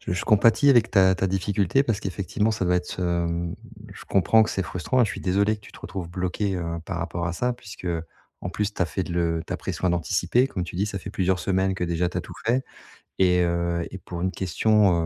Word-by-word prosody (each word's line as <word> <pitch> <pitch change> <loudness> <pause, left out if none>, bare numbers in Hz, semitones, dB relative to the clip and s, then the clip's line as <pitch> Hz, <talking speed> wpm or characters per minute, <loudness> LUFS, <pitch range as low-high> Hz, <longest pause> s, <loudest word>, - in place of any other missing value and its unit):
je - - -4
je 90 - -2
compatis 110 +5 +5
avec 120 -4 +4
ta 95 -3 +5
ta 95 - 0
difficulté 95 +5 +1
parce 115 -5 -1
qu'effectivement 100 +2 -1
ça 105 -3 -1
doit 90 0 +3
être, 90 +1 -4
hem. 85 -1 -1 0.4
Je - - -12
comprends 110 +3 +4
que 110 - 0
c'est 95 - -1
frustrant 90 +9 -1
et 120 - +6
je - - -2
suis - - -6
désolé 100 +3 +2
que - - -20
tu - - -15
te - - -14
retrouves 85 0 -6
bloqué, 95 +2 -1
heu, 85 - -3 0.2
par 90 -2 -4
rapport 85 +1 -3
à 85 - -2
ça 125 +7 0
puisque, 100 -5 -11
heu, 85 -2 -1 0.4
en 90 - -3
plus, 105 +2 -2
tu - - 0
as - - +1
fait 90 +2 -3
le 85 -1 0
tu - - -4
as - - -1
pris - - -4
soin 90 - 0
d'anticiper. 90 - +2
Comme 95 -9 -4
tu 85 - -8
dis, 100 - +1
ça 100 -1 -4
fait - - -7
plusieurs 95 -1 +1
semaines 95 0 +1
que 90 - -2
déjà 85 +1 0
tu 90 - -3
as - - -1
tout - - -11
fait 125 +4 +1 0.5
et 90 -1 +4
heu, 85 0 0
et 95 - -7
pour 85 -1 -7
une 95 +1 0
question, 100 +2 +3
95 Hz, 255 wpm, -25 LUFS, 85-105 Hz, 0.5 s, et